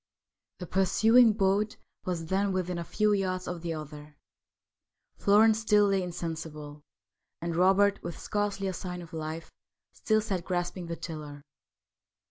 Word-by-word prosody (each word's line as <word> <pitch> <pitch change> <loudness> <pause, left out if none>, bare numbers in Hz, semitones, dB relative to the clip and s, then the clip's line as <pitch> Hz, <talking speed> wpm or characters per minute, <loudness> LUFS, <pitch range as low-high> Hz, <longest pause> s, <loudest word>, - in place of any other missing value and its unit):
The 180 - -6
pursuing 220 +6 +5
boat 200 +1 +1 0.3
was 175 -3 -2
then 195 +3 0
within 180 -1 -2
a - - -3
few 210 +4 +1
yards 185 -2 -1
of 175 -1 -4
the 165 -1 -3
other. 150 -1 -9 1.0
Florence 215 +2 +4
still 210 -2 +4
lay 195 -1 +2
insensible, 160 -4 -6 0.6
and 170 0 -3
Robert, 195 +3 +4
with 170 -1 -6
scarcely 205 -2 -2
a 190 - -2
sign 180 0 -6
of 165 +1 -14
life, 160 +1 -5 0.4
still 215 -1 +1
sat 195 -5 -3
grasping 175 0 -3
the 170 - -3
tiller. 150 -4 -8
180 Hz, 140 wpm, -29 LUFS, 165-200 Hz, 1.0 s, pursuing